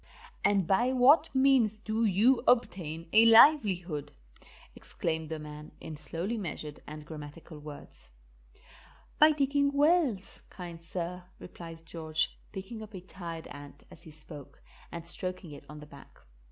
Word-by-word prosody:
"And 200 Hz, -3 st, +3 dB
by 235 Hz, +8 st, +2 dB
what 260 Hz, +4 st, +5 dB
means 260 Hz, -5 st, +3 dB
do 220 Hz, +1 st, -1 dB
you 220 Hz, +6 st, +3 dB
obtain 170 Hz, -9 st, +1 dB
a 220 Hz, +1 st, +7 dB
livelihood?" 200 Hz, -, +5 dB, 0.6 s
exclaimed 160 Hz, -1 st, -4 dB
the 160 Hz, -, -4 dB
man, 150 Hz, 0 st, -10 dB
in 160 Hz, -, -8 dB
slowly 165 Hz, -, -4 dB
measured 155 Hz, -5 st, -6 dB
and 150 Hz, 0 st, -9 dB
grammatical 150 Hz, +1 st, -10 dB
words. 150 Hz, -, -12 dB, 1.1 s
"By 305 Hz, +1 st, +8 dB
digging 280 Hz, -1 st, +1 dB
wells, 285 Hz, -, +1 dB
kind 170 Hz, -2 st, -9 dB
sir," 175 Hz, +1 st, -5 dB
replied 165 Hz, -2 st, -11 dB
George, 160 Hz, -1 st, -1 dB, 0.2 s
picking 210 Hz, +3 st, -7 dB
up 215 Hz, -1 st, -10 dB
a 185 Hz, -, -7 dB
tired 170 Hz, -3 st, -8 dB
ant 145 Hz, 0 st, -11 dB
as 160 Hz, -, -15 dB
he 165 Hz, -, -14 dB
spoke 150 Hz, -2 st, -4 dB, 0.3 s
and 170 Hz, 0 st, -8 dB
stroking 180 Hz, -1 st, -1 dB
it 145 Hz, -, -11 dB
on 150 Hz, 0 st, -9 dB
the 150 Hz, -, -11 dB
back. 140 Hz, -, -16 dB
175 Hz, 140 wpm, -30 LUFS, 155-225 Hz, 1.1 s, By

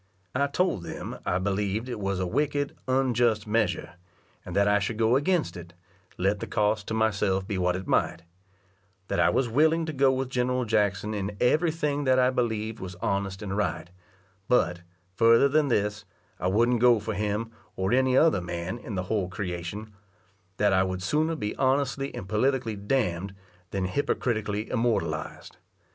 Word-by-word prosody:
I 140 Hz, +2 st, +1 dB
told 160 Hz, -, 0 dB
them 85 Hz, -, -7 dB
I 90 Hz, -, +2 dB
believed 100 Hz, +4 st, -1 dB
it 120 Hz, -4 st, -5 dB
was 100 Hz, -1 st, -2 dB
a 95 Hz, -, 0 dB
wicked, 145 Hz, +6 st, -1 dB
unjust 120 Hz, -4 st, +2 dB
measure, 105 Hz, -5 st, -1 dB, 0.5 s
and 90 Hz, -, -7 dB
that 100 Hz, 0 st, +4 dB
I 105 Hz, 0 st, +4 dB
should 105 Hz, +2 st, -3 dB
go 115 Hz, +2 st, +3 dB
against 160 Hz, +4 st, +1 dB
it, 85 Hz, -1 st, -10 dB, 0.4 s
let 100 Hz, +3 st, +1 dB
the -, -, -5 dB
cost 105 Hz, 0 st, 0 dB
to 110 Hz, -, -2 dB
myself 100 Hz, -3 st, +1 dB
be 100 Hz, -3 st, -2 dB
what 90 Hz, 0 st, +1 dB
it 95 Hz, +1 st, -5 dB
might; 85 Hz, -, 0 dB, 0.9 s
that 100 Hz, -, 0 dB
I -, -, +5 dB
was 130 Hz, -, +1 dB
willing 160 Hz, +7 st, +3 dB
to 160 Hz, -, -4 dB
go 135 Hz, -1 st, +4 dB
with 130 Hz, 0 st, -2 dB
General 125 Hz, 0 st, 0 dB
Jackson 105 Hz, -1 st, 0 dB
in 100 Hz, 0 st, -4 dB
every 155 Hz, +7 st, +3 dB
thing 150 Hz, -3 st, -1 dB
that 130 Hz, 0 st, +4 dB
I 130 Hz, 0 st, +4 dB
believed 110 Hz, -3 st, -2 dB
was 95 Hz, -1 st, -7 dB
honest 100 Hz, +2 st, -2 dB
and 100 Hz, -1 st, -3 dB
right; 100 Hz, -4 st, -2 dB, 0.6 s
but, 90 Hz, -8 st, +2 dB, 0.3 s
further 115 Hz, +6 st, +5 dB
than 150 Hz, +1 st, +2 dB
this, 105 Hz, -4 st, 0 dB, 0.4 s
I 90 Hz, -, -1 dB
wouldn't 115 Hz, +5 st, +2 dB
go 120 Hz, -2 st, +6 dB
for 110 Hz, +1 st, -4 dB
him, 105 Hz, +3 st, -2 dB, 0.2 s
or 95 Hz, +4 st, 0 dB
any 130 Hz, 0 st, +3 dB
other 155 Hz, -, +4 dB
man 90 Hz, +5 st, -4 dB
in 110 Hz, -, -6 dB
the 90 Hz, -, -1 dB
whole 95 Hz, -1 st, -1 dB
creation; 95 Hz, +3 st, -5 dB, 0.6 s
that 105 Hz, -1 st, +3 dB
I 95 Hz, -, +4 dB
would 95 Hz, -1 st, -2 dB
sooner 155 Hz, -, +1 dB
be 105 Hz, -8 st, -3 dB
honestly 135 Hz, 0 st, +1 dB
and 90 Hz, -, -6 dB
politically 115 Hz, +1 st, 0 dB
d 100 Hz, +6 st, -1 dB, 0.2 s
nd, 95 Hz, +1 st, -7 dB, 0.3 s
than 95 Hz, -1 st, -2 dB
hypocritically 110 Hz, -1 st, -1 dB
immortalized. 120 Hz, -2 st, -2 dB
110 Hz, 175 wpm, -27 LUFS, 95-130 Hz, 0.9 s, go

